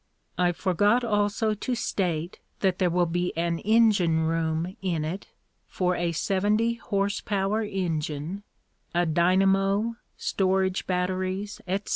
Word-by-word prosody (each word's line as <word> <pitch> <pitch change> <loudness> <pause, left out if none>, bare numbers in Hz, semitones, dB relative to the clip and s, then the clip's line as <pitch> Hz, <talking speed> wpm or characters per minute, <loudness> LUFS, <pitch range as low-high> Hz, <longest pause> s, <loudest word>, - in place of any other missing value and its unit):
I 175 +1 +2
forgot 205 +7 +2
also 210 0 +1
to 245 +4 -3
state 175 -6 -2 0.2
that 190 -2 +1
there 185 -2 +3
will 175 +1 +2
be 175 0 -2
an 170 0 0
engine 210 -7 +3
room 165 +2 -1
in 170 -5 -1
it 180 +5 -5 0.4
for 180 -1 0
a 175 -1 0
seventy 205 +7 +1
horse 200 -3 -1
power 200 +1 0
engine, 170 -3 -3 0.5
a 175 0 +3
dynamo, 195 +6 +2 0.2
storage 190 -1 0
batteries, 185 +2 -2
etc. 195 +3 -2
185 Hz, 125 wpm, -26 LUFS, 175-205 Hz, 0.5 s, there